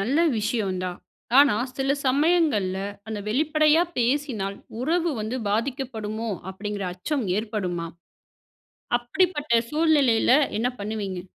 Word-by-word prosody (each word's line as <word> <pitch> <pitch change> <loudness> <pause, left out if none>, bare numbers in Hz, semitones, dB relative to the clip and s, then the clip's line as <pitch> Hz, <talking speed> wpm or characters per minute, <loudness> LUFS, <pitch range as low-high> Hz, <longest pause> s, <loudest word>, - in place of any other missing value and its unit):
நல்ல 245 +9 0 0.2
விஷயம் 210 -3 -1
தான். 180 -1 -4 0.4
ஆனா, 280 -6 +7 0.2
"சில 270 +1 +1
சமயங்கள்ல 280 - +2 0.3
அந்த 220 -1 -3
வெளிப்படையா 305 +6 +3 0.2
பேசினால், 240 -6 0 0.2
உறவு 335 +5 +1
வந்து 220 +4 -3
பாதிக்கப்படுமோ?" 225 -2 -2 0.2
அப்படிங்கிற 205 +1 -5
அச்சம் 265 - -2
ஏற்படுமா? 185 -6 -3 1.1
அப்படிப்பட்ட 290 -1 +1
சூழ்நிலையில 300 -8 +3 0.3
என்ன 230 +3 +1
பண்ணுவீங்க? 200 -3 -4
235 Hz, 100 wpm, -25 LUFS, 210-290 Hz, 1.1 s, ஆனா